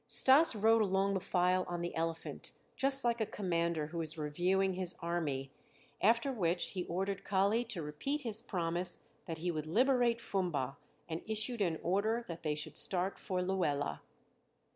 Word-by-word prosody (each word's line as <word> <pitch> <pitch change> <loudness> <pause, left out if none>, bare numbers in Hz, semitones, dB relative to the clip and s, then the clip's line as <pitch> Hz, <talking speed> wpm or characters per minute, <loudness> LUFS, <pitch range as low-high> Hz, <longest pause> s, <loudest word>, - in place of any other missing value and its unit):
Stas 270 +1 +8
rode 225 +2 +4
along 195 -1 +1
the 190 - 0
file 180 0 +1
on 175 -1 -4
the 175 - -4
elephant, 165 0 -4 0.2
just 270 0 +2
like 235 -1 0
a - - +2
commander 170 -6 -1
who 165 +2 -5
is 160 0 -2
reviewing 180 +6 0
his 185 -1 -1
army, 150 -6 -3 0.5
after 230 +6 +3
which 175 -7 -1
he 180 -3 -4
ordered 190 +2 -3
Kali 200 +4 +1
to 195 -8 -4
repeat 275 - -3
his 225 -2 +4
promise 175 -5 -1 0.2
that 165 - -4
he 175 +2 -2
would 155 -2 -4
liberate 240 - +2
Fumba, 155 - -2 0.3
and 165 0 -4
issued 220 +2 0
an 170 -5 +1
order 215 +6 0
that 170 -1 -7
they 150 -2 -1
should 150 0 -4
start 185 +1 +1
for 185 -1 -2
Luela. 175 -7 -1
185 Hz, 165 wpm, -33 LUFS, 165-215 Hz, 0.5 s, Stas